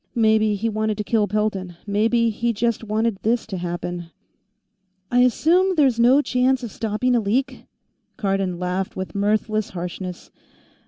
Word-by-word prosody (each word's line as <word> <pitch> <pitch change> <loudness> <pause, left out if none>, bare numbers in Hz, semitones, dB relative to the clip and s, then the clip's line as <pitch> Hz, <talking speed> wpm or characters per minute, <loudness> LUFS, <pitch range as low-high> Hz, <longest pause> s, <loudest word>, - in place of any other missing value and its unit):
Maybe 220 -2 +3
he 215 +3 -2
wanted 215 -1 -1
to 210 - -2
kill 210 -1 +1
Pelton; 200 -4 -2
maybe 225 +3 +2
he 235 +2 -1
just 230 +1 -1
wanted 220 -1 -1
this 230 +2 0
to 195 -4 -5
happen." 175 -1 -4 1.0
"I 245 - +3
assume 340 +10 +3
there's 270 -7 +3
no 255 +5 +5
chance 255 0 +1
of 235 - -5
stopping 225 +4 0
a - - +4
leak?" 230 +6 -2 0.5
Cardon 195 -3 -1
laughed 180 +1 -3
with 190 0 -5
mirthless 215 +1 0
harshness. 180 0 -6
215 Hz, 150 wpm, -22 LUFS, 195-235 Hz, 1.0 s, no